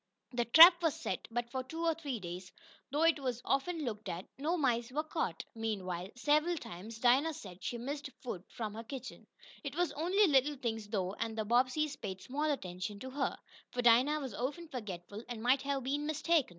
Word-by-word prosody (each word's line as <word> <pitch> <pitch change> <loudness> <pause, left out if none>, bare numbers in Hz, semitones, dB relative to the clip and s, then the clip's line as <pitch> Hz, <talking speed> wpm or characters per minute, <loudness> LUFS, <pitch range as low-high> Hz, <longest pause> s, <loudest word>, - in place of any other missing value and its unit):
The 240 -1 0
trap 340 - +10
was 325 -2 +1
set, - - -3
but 235 +1 -3
for 260 - -1
two 325 +6 -4
or 330 - +4
three 290 -7 -4
days, 180 0 -7 0.4
though 295 +3 +1
it 330 -2 +5
was 250 -3 -2
often 305 +3 0
looked 215 -3 -4
at, 175 +3 -4
no 325 +5 0
mice 240 -5 +1
were 300 +4 0
caught. 310 - -3
Meanwhile, 190 -5 -3
several 305 +6 +2
times, 220 - -8
Dinah 265 +7 +3
said 185 -6 -10
she 240 - -2
missed 280 +4 -4
food 195 -8 -5
from 215 -3 -5
her 225 +1 -6
kitchen. 260 +2 -8 0.4
It 285 -1 -5
was 350 -1 +1
only 365 +7 +3
little 290 -2 +3
things, 225 -4 -3
though, 195 -3 -1
and 225 +1 -3
the 215 - -1
Bobbseys 260 +6 +2
paid 190 -3 -4
small 290 +9 -2
attention 195 -6 -3
to 260 - -6
her, 270 0 -1 0.3
for 245 - -2
Dinah 250 +6 +5
was 265 -6 -5
often 290 - -3
forgetful, 205 - -6
and 230 -2 -5
might 255 +2 +4
have 275 -1 -1
been 290 +3 -1
mistaken. 310 -1 +2
255 Hz, 200 wpm, -33 LUFS, 220-300 Hz, 0.4 s, trap